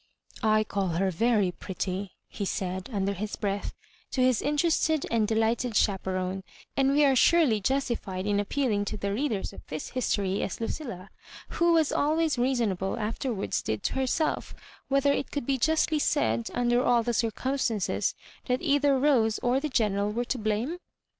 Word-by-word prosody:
" -, -, -17 dB
I 215 Hz, 0 st, +3 dB
call 200 Hz, -2 st, -2 dB
her 185 Hz, +3 st, 0 dB
very 210 Hz, 0 st, +2 dB
pretty," 190 Hz, +1 st, -5 dB
he -, -, -6 dB
said, 185 Hz, 0 st, -3 dB
under 200 Hz, -2 st, 0 dB
his 205 Hz, +2 st, -4 dB
breath, 200 Hz, -1 st, -3 dB, 0.3 s
to -, -, -4 dB
his 255 Hz, -3 st, +3 dB
interested 310 Hz, +1 st, +1 dB
and 225 Hz, -2 st, +2 dB
delighted 225 Hz, +1 st, 0 dB
chaperone; 190 Hz, -1 st, 0 dB, 0.3 s
and 270 Hz, 0 st, +3 dB
we 295 Hz, +1 st, +5 dB
are 270 Hz, -1 st, +4 dB
surely 265 Hz, -6 st, +4 dB
justified 220 Hz, -6 st, -1 dB
in 205 Hz, -1 st, +1 dB
appealing 210 Hz, -1 st, 0 dB
to -, -, -4 dB
the 200 Hz, 0 st, -2 dB
readers 225 Hz, -4 st, -2 dB
of -, -, -10 dB
this 155 Hz, 0 st, -5 dB
history, 200 Hz, -6 st, -1 dB
as -, -, -3 dB
Lucilla, 225 Hz, -, -5 dB, 0.4 s
who 340 Hz, 0 st, +2 dB
was 320 Hz, -3 st, +3 dB
always 310 Hz, -1 st, +1 dB
reason 240 Hz, -4 st, +2 dB
able, 190 Hz, +3 st, -3 dB
afterwards 225 Hz, 0 st, -2 dB
did 110 Hz, -1 st, -3 dB
to -, -, -1 dB
herself, 265 Hz, +4 st, -1 dB, 0.3 s
whether 275 Hz, +1 st, +3 dB
it -, -, -2 dB
could 285 Hz, -4 st, -4 dB
bejustljcsaid, 275 Hz, -, +1 dB
under 245 Hz, 0 st, +2 dB
all 240 Hz, -1 st, +3 dB
the 240 Hz, +1 st, -1 dB
circumstances, 230 Hz, -1 st, 0 dB, 0.3 s
that 250 Hz, 0 st, +1 dB
either 285 Hz, -3 st, +3 dB
Rose 255 Hz, -6 st, +3 dB
or 245 Hz, +2 st, +2 dB
the 305 Hz, +2 st, -3 dB
General 210 Hz, -5 st, +1 dB
were 240 Hz, +3 st, -2 dB
to 255 Hz, 0 st, -2 dB
blame? 220 Hz, +11 st, -1 dB
230 Hz, 165 wpm, -27 LUFS, 200-270 Hz, 0.4 s, we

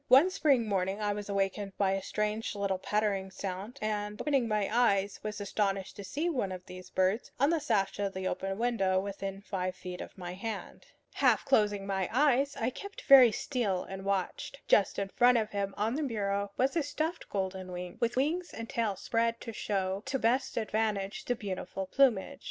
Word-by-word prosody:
One 275 Hz, +9 st, +7 dB
spring 275 Hz, -10 st, +3 dB
morning 195 Hz, 0 st, 0 dB
I 205 Hz, -1 st, 0 dB
was 205 Hz, 0 st, -6 dB
awakened 195 Hz, 0 st, -1 dB
by 195 Hz, -2 st, +2 dB
a 195 Hz, 0 st, 0 dB
strange 210 Hz, +2 st, -2 dB
little 200 Hz, -2 st, -1 dB
pattering 200 Hz, -1 st, 0 dB
sound, 195 Hz, +6 st, -6 dB
and, 210 Hz, -1 st, -2 dB
opening 275 Hz, -5 st, +1 dB
my 210 Hz, -2 st, +1 dB
eyes, 200 Hz, -5 st, +2 dB
was 215 Hz, 0 st, -4 dB
astonished 195 Hz, -1 st, -1 dB
to 200 Hz, -, -7 dB
see 290 Hz, -, -2 dB
one 250 Hz, -, -1 dB
of 180 Hz, -1 st, -7 dB
these 185 Hz, 0 st, -10 dB
birds 190 Hz, +5 st, +1 dB
on 280 Hz, +4 st, +4 dB
the 335 Hz, -, +2 dB
sash 210 Hz, -10 st, 0 dB
of 200 Hz, -1 st, -1 dB
the 190 Hz, 0 st, -2 dB
open 195 Hz, +1 st, -2 dB
window 210 Hz, -6 st, +2 dB
within 195 Hz, 0 st, -5 dB
five 185 Hz, -2 st, -3 dB
feet 180 Hz, 0 st, -7 dB
of -, -, -9 dB
my 180 Hz, -1 st, -6 dB
hand. 210 Hz, +2 st, -6 dB, 0.3 s
Half -, -, +3 dB
closing 210 Hz, -6 st, +2 dB
my 190 Hz, -2 st, -1 dB
eyes, 280 Hz, +1 st, +3 dB
I 230 Hz, +3 st, 0 dB
kept 400 Hz, +9 st, -8 dB
very 260 Hz, -4 st, +9 dB
still 215 Hz, -7 st, -1 dB
and 195 Hz, 0 st, -7 dB
watched. 200 Hz, +7 st, -2 dB
Just 200 Hz, -, +4 dB
in 200 Hz, -1 st, -1 dB
front 245 Hz, +3 st, +5 dB
of 215 Hz, -1 st, -1 dB
him, 200 Hz, -1 st, -2 dB
on 215 Hz, +3 st, 0 dB
the 300 Hz, -, -1 dB
bureau, 200 Hz, -6 st, -1 dB
was 265 Hz, +5 st, +2 dB
a 330 Hz, -, +3 dB
stuffed 310 Hz, +4 st, -3 dB
golden 190 Hz, -2 st, -3 dB
wing, 180 Hz, 0 st, -6 dB
with 235 Hz, 0 st, 0 dB
wings 325 Hz, +7 st, 0 dB
and 230 Hz, 0 st, -5 dB
tail 225 Hz, -4 st, -1 dB
spread 230 Hz, +4 st, 0 dB
to 230 Hz, -, -6 dB
show 195 Hz, -2 st, -1 dB
to 270 Hz, 0 st, 0 dB
best 245 Hz, +2 st, +1 dB
advantage 215 Hz, -3 st, -1 dB
the 245 Hz, -, 0 dB
beautiful 195 Hz, -2 st, -4 dB
plumage. 260 Hz, +3 st, +2 dB
205 Hz, 195 wpm, -31 LUFS, 195-240 Hz, 0.3 s, very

